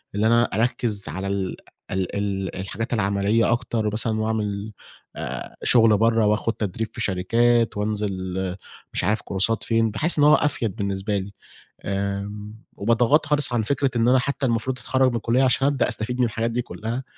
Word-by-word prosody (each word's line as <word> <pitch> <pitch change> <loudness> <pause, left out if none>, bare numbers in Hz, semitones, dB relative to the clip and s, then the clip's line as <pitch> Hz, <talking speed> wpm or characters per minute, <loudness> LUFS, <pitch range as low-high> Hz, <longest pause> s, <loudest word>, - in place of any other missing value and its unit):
اللي 105 +2 +2
أنا 115 +1 +5
أركِّز 110 -3 0
على 95 +5 -4
ال 100 -1 -2 0.4
ال 95 -1 -2
ال 95 -2 -2
الحاجات 110 +5 -4
العملية 100 +1 +2
أكتر 115 -3 -1
مثلًا 110 +1 -1
وأعمل 105 -1 -2 0.4
آآ - - -6
شُغل 115 -3 +5
برّه 115 0 +3
وآخد 105 +2 +1
تدريب 110 +1 -3
في 115 - -5
شركات 115 +4 +2
وأنزِل 95 -3 -2 0.4
مش - - -1
عارف 105 +4 +1
كورسات 100 +4 -1
فين، 115 -1 +1
باحس 160 +11 -1
إن - - +5
هو 150 - +7
أفيَد 120 -8 0
بالنسبة 100 -1 -2
لي. 100 +1 -5 0.5
آمم، 100 +2 -3 0.2
وباتغاضي 115 +8 +3
خالص 150 -3 +2
عن 115 -2 +1
فكرة 135 +3 0
إن 115 0 +2
أنا 130 +1 +5
حتى 140 +2 -2
المفروض 125 +2 -1
أتخرج 130 +2 +2
من 120 - -3
الكلّية 115 +3 +1
عشان 135 +1 +3
أبدأ 140 -1 +1
أستفيد 125 +4 -3
من 125 - +4
الحاجات 115 0 -1
دي 120 +2 0
كلّها 120 +1 -5
110 Hz, 170 wpm, -23 LUFS, 100-120 Hz, 0.5 s, هو